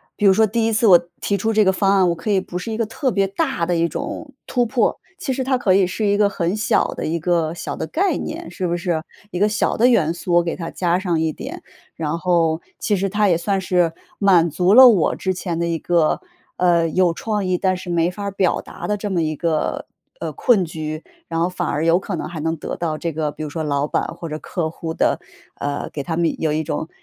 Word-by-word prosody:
比 205 - -1
如 195 - +7
说 220 +2 +4
第 225 +2 0
一 225 - +1
次 220 +1 +3
我 180 -3 +9 0.2
提 200 - 0
出 225 +4 0
这 215 0 +5
个 190 - +4
方 195 +1 +2
案， 185 -2 +4
我 170 - 0
可 205 +6 -3
以 195 - +3
不 180 - -6
是 220 +5 -5
一 220 - -3
个 230 - 0
特 260 +3 -1
别 195 -1 +1
大 190 -3 -1
的 175 - +1
一 170 0 +2
种 275 - -6
突 245 -1 +1
破， 240 +2 +1 0.2
其 275 - -2
实 260 0 -1
它 260 -1 +1
可 190 -5 +3
以 195 -1 +4
是 190 +4 -2
一 205 0 +2
个 210 - +4
很 185 -1 -1
小 210 - +2
的 - - -4
一 165 +2 -1
个 165 -1 0
小 170 - -5
的 - - -3
概 355 - 0
念， 330 +2 -6
是 185 - -4
不 170 - 0
是？ 170 -2 -1 0.3
一 180 - -5
个 205 +3 +3
小 210 - 0
的 240 +3 +5
元 190 -10 +3
素， 175 +1 -3
我 175 - +5
给 170 - -2
它 165 -2 -6
加 175 -1 +1
上 175 -4 0
一 160 -1 +1
点， - - -8 0.3
然 160 +1 -2
后 170 -2 +1 0.2
其 205 - +1
实 195 +1 -1
它 210 +1 +2
也 170 -3 +3
算 190 +3 -1
是 175 -3 +1 0.2
满 180 -5 +4
足 180 +5 +2
了 260 +1 +10
我 200 -9 +4
之 185 -1 -2
前 175 -2 -3
的 170 - 0
一 165 - 0
个， 165 -1 +1 0.4
呃， 170 -2 +3
有 180 +1 +2
创 210 +2 -2
意， 180 -1 0
但 185 -1 +1
是 180 -1 -6
没 170 0 +2
法 200 +3 -7
儿 200 - -2
表 190 -2 +1
达 - - -8
的 210 0 0
这 205 0 -4
么 175 -3 +1
一 155 -1 -1
个， 160 0 -1 0.3
呃， - - -3
困 220 -7 +3
局。 155 -1 -5 0.2
然 165 -1 -2
后 170 - +2
反 180 -2 -3
而 150 +3 -1
有 170 +2 +4
可 195 -1 -4
能 - - -4
还 165 -1 -7
能 160 +2 -1
得 - - -5
到 160 -3 -2
这 170 +1 -3
个， 150 -1 -1
比 155 - -7
如 150 - -4
说 160 +2 -4
老 145 -1 0
板 - - 0
或 170 - -7
者 155 0 -5
客 165 -1 -3
户 160 0 -6
的 - - +1 0.4
呃， 145 0 -3
给 145 - -4
他 165 +3 -3
们 170 -1 +1
有 155 - +1
一 155 +1 0
种 160 +1 -3
175 Hz, 280 characters per minute, -21 LUFS, 165-200 Hz, 0.4 s, 了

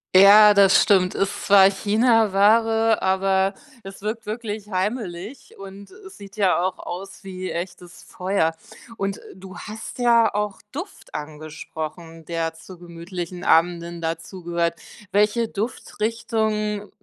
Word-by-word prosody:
Ja, 205 +2 +9
das 195 -1 +6
stimmt. 185 -3 +3
Ist 195 0 -2
zwar 195 -1 +7
Chinaware, 225 +1 +3
aber 190 +1 +1 0.3
es 195 0 -10
wirkt 215 +2 -4
wirklich 215 -1 -5
heimelig 195 +3 -4
und 195 +1 -11
es 385 0 -14
sieht 200 +1 -13
ja 190 -4 +2
auch 185 0 -2
aus 195 +3 -8
wie 185 -1 -6
echtes 175 0 -7
Feuer 180 -3 -1 0.4
und 195 -1 -3 0.2
du 190 0 -11
hast 220 +3 -8
ja 235 -2 +4
auch 210 -1 -3
Duft 395 +3 -9
angesprochen, 155 +2 -8
der 165 0 -2
zu 175 +3 -13
gemütlichen 175 +1 -7
Abenden 170 0 +2
dazugehört. 170 +1 -3 0.4
Welche 210 +3 +2
Duftrichtung 215 -1 -2
195 Hz, 120 wpm, -22 LUFS, 175-215 Hz, 0.4 s, Ja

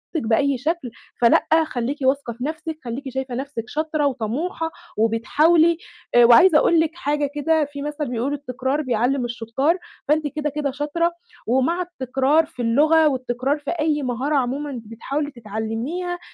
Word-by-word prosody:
بأي 275 0 +1
شكل 305 -2 -2 0.3
فلأ، 235 - +4 0.2
خلّيكِ 260 0 -3
واثقة 265 -2 +1
في 240 +2 -8
نَفْسِك، 310 +1 -4
خلّيكِ 265 +3 -5
شايفة 260 -1 -4
نَفْسِك 270 -3 -4
شاطرة 310 -1 -1
وطموحة 285 +7 -2 0.3
وبتحاولي 310 +10 +3 0.4
آآ، 240 0 +8
وعايزة 310 +8 +7
أقول 335 +2 +4
لِك 320 0 +1
حاجة 290 -3 -1
كده 315 +1 +2
في 285 0 -8
مثلًا 295 0 -3
بيقول 250 +3 -2
التكرار 270 +1 -2
بيعلِّم 250 0 0
الشُطّار، 240 +8 0 0.3
فأنتِ 300 +1 +2
كده، 300 +1 -3
كده 290 -1 -2
شاطرة، 295 +5 -1 0.4
ومع 265 +9 +1
التكرار 285 -2 +1
في 305 -6 -9
اللغة 305 +7 +4
والتكرار 255 +1 -1
في 290 - -4
أي 305 -3 0
مهارة 260 +4 -1
عمومًا 270 0 -1
بتحاولي 280 +7 -4
تتعلِّميها 235 - -4
280 Hz, 145 wpm, -22 LUFS, 245-310 Hz, 0.4 s, آآ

